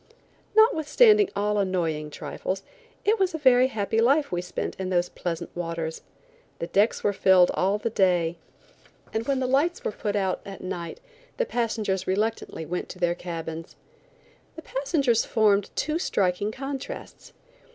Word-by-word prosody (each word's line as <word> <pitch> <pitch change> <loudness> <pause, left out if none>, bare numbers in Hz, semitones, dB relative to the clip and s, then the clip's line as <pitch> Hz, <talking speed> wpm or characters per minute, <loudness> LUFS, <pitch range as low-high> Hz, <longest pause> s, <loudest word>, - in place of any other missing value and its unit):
Notwithstanding 430 0 +5
all 210 +1 +1
annoying 165 -6 -1
trifles 185 +5 -5 0.4
it 435 +1 +3
was 375 -3 +1
a - - -1
very 255 -3 +5
happy 220 -2 0
life 280 +5 +3
we 175 -1 -1
spent 180 - -4
in 190 -1 -2
those 175 -1 +1
pleasant 170 -1 -5
waters. 165 -2 -4 0.6
The - - -3
decks 205 +6 +1
were 205 - +2
filled 190 -2 +5
all 195 +3 +1
the 225 +2 -3
day, 175 -5 +2 0.8
and 220 +1 -2
when 275 -2 +1
the 260 - 0
lights 285 +7 +1
were - - -1
put 205 0 -3
out 190 -2 0
at 195 -1 -9
night 180 - -5 0.4
the - - +1
passengers 220 - -1
reluctantly 205 -4 -1
went 180 +3 -4
to - - -8
their 175 -1 +2
cabins. 165 -2 -6 0.8
The 320 - -9
passengers 275 -5 +1
formed 205 -3 +2
two 310 +2 -1
striking 200 - 0
contrasts. 270 +2 -7
205 Hz, 150 wpm, -26 LUFS, 180-265 Hz, 0.8 s, Notwithstanding